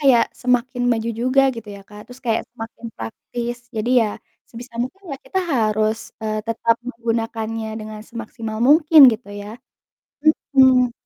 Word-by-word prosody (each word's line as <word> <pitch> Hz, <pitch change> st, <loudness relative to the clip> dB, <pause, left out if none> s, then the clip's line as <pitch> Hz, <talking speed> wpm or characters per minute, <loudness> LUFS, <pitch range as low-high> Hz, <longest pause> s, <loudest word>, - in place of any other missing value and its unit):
kayak 260 Hz, -5 st, +5 dB, 0.2 s
semakin 250 Hz, 0 st, +1 dB
maju 230 Hz, -1 st, 0 dB
juga 255 Hz, +2 st, +3 dB
gitu 225 Hz, -2 st, -9 dB
ya, -, -, -11 dB
Kak. 210 Hz, 0 st, -12 dB
Terus 250 Hz, +1 st, -12 dB
kayak 225 Hz, -1 st, +1 dB
semakin 230 Hz, 0 st, -8 dB
praktis 240 Hz, -, -5 dB, 0.2 s
jadi 225 Hz, +3 st, -1 dB
ya 220 Hz, -, 0 dB, 0.4 s
sebisa 240 Hz, +1 st, -11 dB
mungkin 365 Hz, +11 st, -7 dB
lah 275 Hz, -, -5 dB
kita 380 Hz, -, -1 dB, 0.2 s
harus, 215 Hz, -1 st, +1 dB, 0.3 s
eee, 215 Hz, 0 st, -1 dB
tetap 230 Hz, 0 st, +1 dB
menggunakannya 225 Hz, -1 st, -3 dB
dengan 215 Hz, 0 st, -8 dB
semaksimal 225 Hz, -1 st, -6 dB
mungkin 315 Hz, +1 st, +6 dB
gitu 220 Hz, -1 st, -7 dB
ya. 205 Hz, -, -8 dB, 1.0 s
Mhm, 255 Hz, -2 st, +5 dB
230 Hz, 145 wpm, -21 LUFS, 220-250 Hz, 1.0 s, mungkin